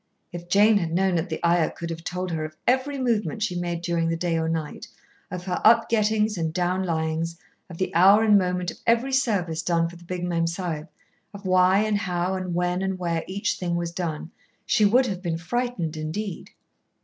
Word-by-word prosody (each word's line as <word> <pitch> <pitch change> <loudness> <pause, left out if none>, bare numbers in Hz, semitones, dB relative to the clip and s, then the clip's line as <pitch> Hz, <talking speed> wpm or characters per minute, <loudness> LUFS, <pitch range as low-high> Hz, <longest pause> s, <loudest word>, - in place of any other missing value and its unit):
If 175 -1 -8
Jane 205 +3 +5
had 170 -3 -3
known 190 +1 +2
that 170 +1 -1
the 160 - -3
Ayah 170 -1 +3
could 170 -1 -6
have 165 0 -6
told 180 +1 -3
her 160 -1 -2
of 155 0 -7
every 265 +3 +1
movement 230 -3 0
she 180 - -1
made 175 -1 -3
during 170 -1 0
the 165 - -1
day 170 0 -1
or 160 0 0
night, 160 -2 -4 0.4
of 180 -1 -6
her 180 -2 -2
up 230 +1 +5
gettings 215 -2 +1
and 160 -1 -1
down 180 +2 0
lyings, 165 -1 -2 0.3
of 170 - -9
the 185 - -2
hour 195 +6 +6
and 215 -2 +5
moment 180 -2 +1
of - - -13
every 235 +4 +2
service 195 -11 0
done 165 0 +1
for 170 +1 -10
the 175 - -16
big 180 0 -5
Mem 170 -1 0
Sahib, 165 -2 -4 0.5
of 200 0 -10
why 185 +1 +4
and 215 -1 0
how 180 -2 -1
and 185 -2 -3
when 180 +1 0
and 190 -1 -2
where 170 -2 -2
each 195 +2 -2
thing 175 -2 -1
was 170 -1 -2
done, 170 -2 -4 0.3
she 215 - +3
would 245 +6 +4
have 190 -6 -4
been 170 -3 -2
frightened 180 -3 -2
indeed. 165 +5 -5
180 Hz, 210 wpm, -25 LUFS, 165-200 Hz, 0.5 s, hour